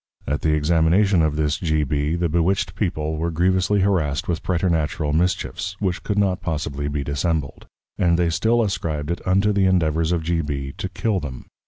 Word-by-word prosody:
At 75 +2 -2
the 80 - +2
Examination 85 +5 +3
of 80 -2 +1
this 75 0 0
G. 80 -3 +1
B. 75 +2 -1
the 85 0 0
Bewitched 85 +3 0
People 80 -6 -2
were 85 +2 -1
grievously 95 +4 +2
harrassed 80 -8 0
with 85 -2 -1
Preternatural 80 -4 0
Mischiefs, 90 +1 -1
which 95 -3 -1
could 100 - -2
not 95 -3 +1
possibly 75 -4 -3
be 70 -1 -2
Dissembled; 70 0 -2 0.3
and 85 -2 +3
they 85 -1 +1
still 115 +8 +2
ascribed 80 -6 -2
it 85 - -3
unto 100 +3 +3
the 100 -1 +2
endeavours 80 -3 +1
of 85 -2 0
G. 85 0 0
B. 70 -3 -4
to 95 - -3
Kill 105 0 -1
them. 65 -6 -7
85 Hz, 185 wpm, -22 LUFS, 75-95 Hz, 0.3 s, Examination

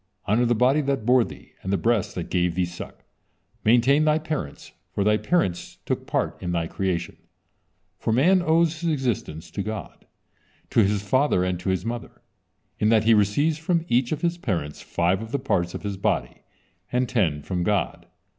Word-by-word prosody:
Honor 115 +4 +2
the 120 - +2
body 130 +6 +3
that 135 -5 -1
bore 125 0 +5
thee, - - -11
and 95 - -4
the 100 - +2
breasts 110 -3 0
that 90 - -5
gave 90 -2 +1
thee 90 -1 +1
suck, 90 0 -9 0.6
maintain 125 +6 +4
thy 155 0 +3
parents, 155 - -5 0.2
for 100 - -1
thy 105 +1 +4
parents 105 - -1
took - - -2
part - - -1
in 90 -1 -2
thy 85 -1 0
creation." 85 0 -2 0.8
For 115 - -1
man 175 +11 +4
owes 165 -1 +2
his 170 - 0
existence 120 - -3
to - - -3
God, 110 +1 -7 0.6
to - - +3
his 100 0 0
father, 130 -3 +2
and 90 -1 -1
to 95 - -3
his 95 +1 -1
mother, 115 0 -6 0.6
in 105 - +3
that 110 -1 +4
he 115 +1 +5
receives 145 +10 +2
from 165 0 0
each 120 0 +2
of 155 - -2
his 175 0 0
parents 80 - -3
five 90 +3 0
of 115 0 -8
the 140 - +1
parts 90 -9 -1
of - - -6
his 100 -2 -3
body, 95 - -1 0.5
and 125 +1 +1
ten 85 - 0
from 90 +1 -2
God. 100 -1 -1
110 Hz, 190 wpm, -24 LUFS, 95-135 Hz, 0.8 s, bore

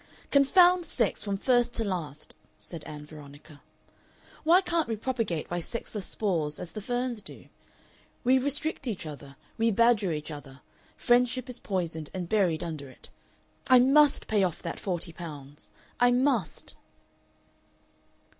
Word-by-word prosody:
"Confound 355 +6 +5
sex 240 -9 +1
from 200 -1 -2
first 245 +2 +2
to 230 - -1
last!" 165 -7 -5 0.2
said 165 -4 -8
Ann 150 -1 -8
Veronica. 145 0 -13 0.8
"Why 335 +4 +6
can't 340 -4 0
we 225 - -1
propagate 220 - -2
by 175 - -2
sexless 210 +1 -5
spores, 165 -8 -1
as 175 - -7
the 215 - -6
ferns 245 +1 -2
do? 195 - -12 0.7
We 260 +1 +4
restrict 285 +1 -2
each 205 -8 -3
other, 145 -2 -9 0.2
we 230 +1 +3
badger 225 -3 +3
each 150 0 -4
other, 140 -3 -10 0.4
friendship 250 +1 +2
is 250 - -6
poisoned 165 -6 -3
and 180 -2 -3
buried 180 -6 +1
under 155 -5 -6
it!... - - -12 0.6
I 255 - +7
MUST 275 +3 +5
pay 210 -2 +1
off 180 -4 -2
that 170 - -4
forty 175 -3 -3
pounds. 145 -4 -9 0.3
I 245 - +5
MUST." 245 - 0
205 Hz, 145 wpm, -28 LUFS, 160-250 Hz, 0.8 s, I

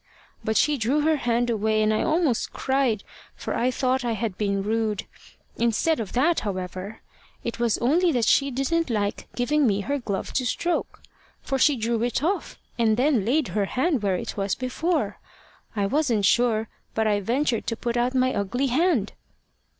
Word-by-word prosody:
But 220 0 0
she 300 -1 +3
drew 260 +7 +1
her 315 +1 +2
hand 240 -2 0
away, 220 0 +1
and 215 0 +2
I 215 - +1
almost 315 -7 +1
cried, 265 -6 0 0.3
for - - -4
I 245 - +1
thought 255 0 0
I 235 -1 0
had 220 -3 -3
been 200 -1 -1
rude. 215 -1 -1 0.5
Instead 235 +8 +1
of 215 -4 -5
that, 310 +7 +3
however, 185 +1 -5 0.4
it 235 0 -4
was 235 -2 +2
only 335 +8 +3
that 240 -3 +1
she 280 +5 +3
didn't 275 +5 0
like 205 -3 -2
giving 270 +3 +2
me 205 -1 +1
her 280 +7 -2
glove 200 -6 -4
to 260 - +1
stroke, 340 +7 -2 0.4
for 270 - -1
she 290 +1 +5
drew 230 -1 -1
it 245 +3 0
off, 380 +5 -1 0.2
and 220 -2 +3
then 255 -5 +2
laid 280 +5 +1
her 205 -2 0
hand 265 - 0
where 195 -2 +1
it - - -4
was 195 -1 -1
before. 315 +7 -1 0.6
I 200 -2 +1
wasn't 235 -3 +1
sure, 225 -2 +3 0.3
but 220 - +1
I 210 -1 +2
ventured 240 +3 0
to 230 - -2
put 235 0 -2
out 245 +2 +1
my 255 0 +2
ugly 245 +7 -1
hand." 305 - +2
240 Hz, 180 wpm, -25 LUFS, 215-275 Hz, 0.6 s, she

